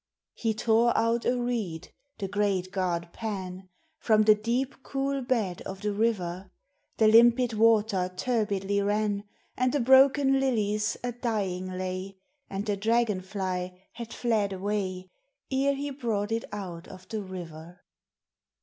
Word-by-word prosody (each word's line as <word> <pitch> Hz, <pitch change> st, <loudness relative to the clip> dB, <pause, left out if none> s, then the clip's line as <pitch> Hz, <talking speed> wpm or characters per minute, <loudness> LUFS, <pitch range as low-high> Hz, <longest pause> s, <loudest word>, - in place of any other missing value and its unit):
He 225 Hz, -2 st, -1 dB
tore 230 Hz, +2 st, +3 dB
out 230 Hz, +1 st, +1 dB
a 250 Hz, 0 st, +1 dB
reed, 225 Hz, -10 st, -3 dB, 0.2 s
the 195 Hz, -, -3 dB
great 195 Hz, -2 st, 0 dB
god 175 Hz, -3 st, -2 dB
Pan, 190 Hz, -4 st, -5 dB, 0.3 s
From 215 Hz, -7 st, +4 dB
the 215 Hz, 0 st, +7 dB
deep, 240 Hz, +6 st, -2 dB
cool 275 Hz, +1 st, -2 dB
bed 225 Hz, -9 st, -1 dB
of 190 Hz, 0 st, -7 dB
the 210 Hz, 0 st, -1 dB
river, 195 Hz, -4 st, -1 dB, 0.5 s
The 220 Hz, -, +5 dB
limpid 235 Hz, +2 st, +6 dB
water 215 Hz, -4 st, +3 dB
turbidly 200 Hz, -4 st, 0 dB
ran, 205 Hz, 0 st, 0 dB, 0.3 s
And 255 Hz, 0 st, +1 dB
the 290 Hz, -, +2 dB
broken 270 Hz, +2 st, +5 dB
lilies 215 Hz, -5 st, 0 dB
a 245 Hz, -, -1 dB
dying 205 Hz, -7 st, -2 dB
lay, 185 Hz, +1 st, -4 dB, 0.3 s
And 195 Hz, +1 st, -4 dB
the 205 Hz, -2 st, -1 dB
dragon 220 Hz, -1 st, +1 dB
fly 185 Hz, -2 st, -4 dB
had 235 Hz, -2 st, -8 dB
fled 215 Hz, -5 st, 0 dB
away, 185 Hz, -2 st, -3 dB, 0.4 s
Ere 275 Hz, +1 st, +2 dB
he 285 Hz, +1 st, -4 dB
brought 225 Hz, -6 st, -2 dB
it 225 Hz, 0 st, -1 dB
out 180 Hz, -4 st, -6 dB
of 185 Hz, -1 st, -12 dB
the 220 Hz, -1 st, -3 dB
river. 175 Hz, -2 st, -9 dB
210 Hz, 140 wpm, -28 LUFS, 185-235 Hz, 0.5 s, the